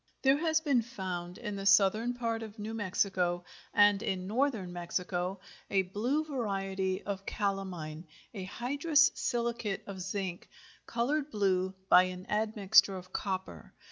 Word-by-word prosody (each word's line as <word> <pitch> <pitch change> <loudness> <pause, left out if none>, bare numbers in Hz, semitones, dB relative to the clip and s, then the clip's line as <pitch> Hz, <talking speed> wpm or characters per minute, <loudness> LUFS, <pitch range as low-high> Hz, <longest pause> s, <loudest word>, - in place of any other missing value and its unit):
There 270 +1 +5
has 315 0 +2
been 280 -6 +3
found 185 -7 -5
in 210 -4 -5
the 195 - -5
southern 210 +5 +4
part 230 -2 -2
of 220 0 -8
New 215 +1 -5
Mexico, 185 -4 0 0.3
and 205 -1 +5
in 185 -1 -2
northern 220 -4 0
Mexico, 180 +1 -2 0.3
a 195 -1 +3
blue 235 +11 -1
variety 195 -8 -2
of 195 -1 -5
calamine, 180 -6 -3 0.3
a 190 -4 -5
hydrous 285 - +3
silicate 235 -5 -2
of 195 -2 -7
zinc, 190 -2 -4 0.4
colored 280 +5 0
blue 190 -4 +1
by 185 -1 +7
an 185 0 -6
admixture 210 -2 +4
of 185 0 -11
copper. 190 -2 -4
200 Hz, 140 wpm, -31 LUFS, 185-235 Hz, 0.4 s, by